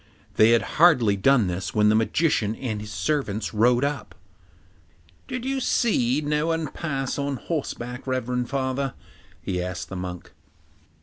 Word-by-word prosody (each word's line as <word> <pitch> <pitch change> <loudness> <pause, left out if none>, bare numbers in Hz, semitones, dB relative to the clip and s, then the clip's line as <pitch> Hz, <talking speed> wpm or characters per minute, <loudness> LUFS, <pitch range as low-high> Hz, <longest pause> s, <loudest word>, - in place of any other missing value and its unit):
They 110 - +6
had 115 - +3 0.2
hardly 125 - +6
done 120 +3 +3
this 90 -1 -4
when 105 0 +4
the - - +4
magician 110 -2 +1
and 110 -5 -4
his 105 - -8
servants 115 -5 -2
rode 120 +4 +3
up. 140 -2 -3 1.1
'Did 250 -1 -4
you 270 0 -1
see 150 - +1
no 150 +1 0
one 165 -2 -1
pass 135 -5 -3
by 140 - -1
on 140 -1 -2
horseback, 125 -4 -5
reverend 125 -1 -1
father?' 135 0 -2 0.5
he 90 -1 -2
asked 90 +1 -5
the 95 - -6
monk. 90 -1 -6
125 Hz, 150 wpm, -24 LUFS, 105-145 Hz, 1.1 s, They